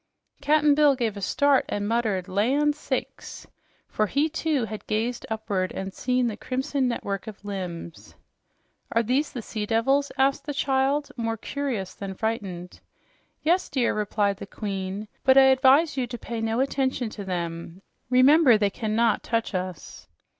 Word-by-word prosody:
Cap'n 295 0 +4
Bill 290 -1 +4
gave 230 -5 -1
a 200 - -7
start 280 +7 +3
and 205 0 -2
muttered 215 -5 0
"Land 265 +10 +1
sakes!" 300 - -5 0.4
for 215 - 0
he, 290 +8 +1
too, 310 -5 0
had 215 0 -8
gazed 230 +3 -2
upward 210 -4 -2
and 190 0 -5
seen 250 +2 0
the 225 -3 -1
crimson 260 +3 -1
network 200 -5 -3
of 210 -1 -10
limbs. 180 -4 -7 0.8
"Are 230 - +3
these 260 +6 0
the 245 -5 -6
sea 210 -1 -4
devils?" 270 +6 +2
asked 275 +2 +1
the 290 - -3
child, 275 +2 +1
more 225 -1 -2
curious 245 -7 -4
than 195 -1 -7
frightened. 190 -5 -4 0.6
"Yes, 350 +4 +2
dear," 255 -3 +1
replied 205 -1 0
the 200 -1 -8
Queen. 195 0 -5 0.2
"But 265 0 +5
I 270 - +9
advise 270 +5 +4
you 250 -2 0
to 240 0 -6
pay 230 -1 -5
no 225 +2 0
attention 265 -3 -1
to 205 - -7
them. 170 0 -5 0.3
Remember, 255 0 +6
they 205 -1 +1
cannot 220 +1 +1
touch 230 -2 -2
us." 185 -3 -5
230 Hz, 160 wpm, -25 LUFS, 200-270 Hz, 0.8 s, I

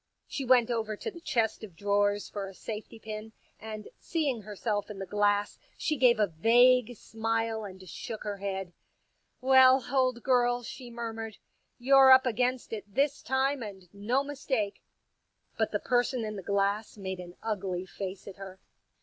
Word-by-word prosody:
She 275 - -4
went 245 -2 +4
over 220 -2 -2
to 450 - -5
the 340 -3 -12
chest 225 -8 0
of 195 -6 -9
drawers 205 +2 +1
for 200 -1 -5
a 195 - -11
safety 220 +2 -7
pin, 215 0 -7 0.3
and 215 -1 -7
seeing 290 -9 -1
herself 205 0 -3
in 210 - -7
the 195 - -5
glass 205 +1 +1 0.2
she 310 - 0
gave 245 -4 +4
a 210 - +5
vague 240 +7 +4
smile 225 0 -2
and 190 -1 -10
shook 215 +5 -6
her 205 -1 -4
head. 195 -2 -4 0.3
" - - -46 0.3
Well, 260 0 +6
old 255 -3 +1
girl," 245 -1 +2
she 245 +1 -8
murmured, 225 -2 -6 0.2
" - - -47
you're 270 -1 +8
up 260 0 +8
against 250 +1 0
it 205 -2 -6
this 280 +6 +1
time, 265 +1 0
and 195 -4 -8
no 230 +7 0
mistake." 265 -7 -2 0.7
But - - 0
the - - 0
person 245 -1 +1
in 215 0 -4
the 195 - -5
glass 200 +3 0
made 190 -2 -5
an 175 0 -9
ugly 190 -4 -2
face 190 0 -7
at 200 - -9
her. 190 -1 -9
220 Hz, 175 wpm, -29 LUFS, 200-250 Hz, 0.7 s, you're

